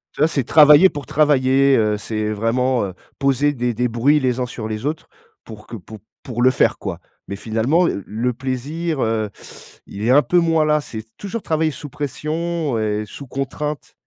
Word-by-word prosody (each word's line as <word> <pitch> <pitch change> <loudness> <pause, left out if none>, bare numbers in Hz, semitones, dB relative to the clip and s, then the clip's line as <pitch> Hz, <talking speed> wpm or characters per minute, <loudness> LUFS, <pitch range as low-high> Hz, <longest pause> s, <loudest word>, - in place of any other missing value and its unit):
Ça, 150 - +3
c'est 140 -4 -1
travailler 150 +6 +7
pour 145 -4 -7
travailler, 140 -2 +3
heu 105 -1 +1
c'est 110 0 -3
vraiment, 120 +4 0
heu, 95 - -6 0.3
poser 140 +1 +2
des 120 -2 -1
des 125 +3 0
bruits 125 +6 +2
les 130 -2 0
uns 125 - 0
sur 115 -2 -6
les 110 +2 -5
autres 155 +2 -3 0.4
pour 105 -1 -12
que - - -8
pou 110 +1 -10 0.3
pour 120 -2 -4
le 130 - +6
faire, - - +2
quoi. - - -5 0.3
Mais 100 - -5
finalement, 115 - +1
l 100 - -2
le 120 +4 -2
plaisir, 135 +6 -3
heu, 110 -1 0 0.6
il 100 - -8
est 115 - +1
un 140 +3 +6
peu 180 - +2
moins 165 -2 +2
là. 150 0 +2
C'est 110 -6 -8
toujours 210 +3 -5
travailler 160 0 0
sous 145 0 -9
pression 155 +1 -3
et 105 -1 -1
sous 140 +7 -11
contrainte. 135 +2 -4
130 Hz, 190 wpm, -20 LUFS, 115-150 Hz, 0.6 s, travailler